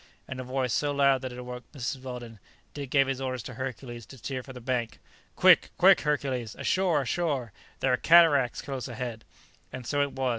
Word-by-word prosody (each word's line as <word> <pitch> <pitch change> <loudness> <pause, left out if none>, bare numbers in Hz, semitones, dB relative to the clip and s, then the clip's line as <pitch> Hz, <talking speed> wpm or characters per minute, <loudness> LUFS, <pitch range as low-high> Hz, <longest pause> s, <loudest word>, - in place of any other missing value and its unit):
In 130 - -6
a - - -4
voice 130 -1 -1
so 145 -1 +1
loud 140 -2 +3
that 130 -1 -5
it 125 - -9
awoke 125 0 -7
Mrs. 130 -1 -4
Weldon, 120 -4 -8 0.3
Dick 140 -3 -6
gave 135 0 +4
his 135 0 -3
order 130 -1 -2
to 125 +2 -7
Hercules 120 -2 -6
to 135 - -12
steer 130 +2 -4
for 135 - -11
the 125 - -9
bank: 120 -2 -2 0.4
"Quick, - - +6
quick, - - +6
Hercules! 135 -6 -1
ashore! 180 -6 +1
ashore! 135 - -1 0.3
there 130 -1 +2
are - - +3
cataracts 155 -7 +5
close 135 -3 -5
ahead!" 120 -2 -5 0.5
And 130 -1 -7
so 145 +3 0
it 140 -1 -1
was. 130 -1 -1
130 Hz, 200 wpm, -28 LUFS, 125-140 Hz, 0.5 s, Quick